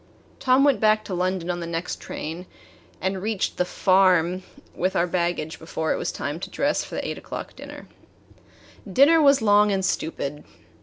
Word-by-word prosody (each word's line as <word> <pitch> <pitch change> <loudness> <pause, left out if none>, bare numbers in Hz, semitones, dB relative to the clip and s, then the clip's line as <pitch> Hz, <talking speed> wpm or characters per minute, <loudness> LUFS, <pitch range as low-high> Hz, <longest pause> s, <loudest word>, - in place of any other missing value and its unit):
Tom 260 +1 +4
went 280 -3 +4
back 215 0 +3
to 195 - -5
London 180 -1 -1
on 175 - -4
the 170 - -5
next 170 +1 -4
train, 165 +4 -6 0.5
and 190 0 -2
reached 215 -1 -2
the 180 - +1
"farm" 185 -1 +3 0.3
with 185 +1 -1
our 170 - +3
baggage 170 -3 -2
before 160 0 -2
it - - -2
was - - -2
time 145 +3 -4
to - - -6
dress 285 +2 0
for - - -8
the - - -3
eight - - -4
o'clock - - -8
dinner. - - -10 1.0
The 195 - -10
dinner 315 - +6
was 280 -5 +5
long 205 0 +5
and 190 -1 0
stupid. 150 -4 -3
185 Hz, 185 wpm, -24 LUFS, 170-215 Hz, 1.0 s, dinner